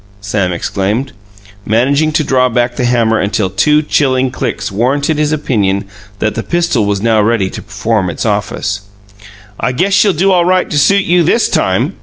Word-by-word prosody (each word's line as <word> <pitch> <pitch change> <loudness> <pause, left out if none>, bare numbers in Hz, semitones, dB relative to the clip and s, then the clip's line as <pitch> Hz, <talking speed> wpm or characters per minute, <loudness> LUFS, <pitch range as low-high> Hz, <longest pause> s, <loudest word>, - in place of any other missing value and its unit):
Sam 100 -2 -1
exclaimed, 100 +9 -2 0.5
managing 140 +9 +1
to 155 - +1
draw 130 -2 +2
back 120 0 0
the 125 - -1
hammer 115 -2 +2
until 100 -1 -1
two 150 +11 +2
chilling 130 -3 +1
clicks 120 - -4
warranted 140 +8 0
his 150 0 +1
opinion 105 -10 0 0.3
that 110 +1 -1
the 115 - -3
pistol 170 -8 0
was 100 0 -1
now 110 -2 +3
ready 105 -3 0
to - - -7
perform 105 -1 -2
its 85 - -4
office. 100 -1 -2 0.8
"I 125 - -1
guess 185 +9 0
she'll 200 0 +4
do 190 +5 +2
all 180 -2 +3
right 185 +1 +1
to 145 - +1
suit 200 +7 +3
you 175 +1 +3
THIS 180 +8 +2
time!" - - 0
120 Hz, 180 wpm, -13 LUFS, 105-150 Hz, 0.8 s, she'll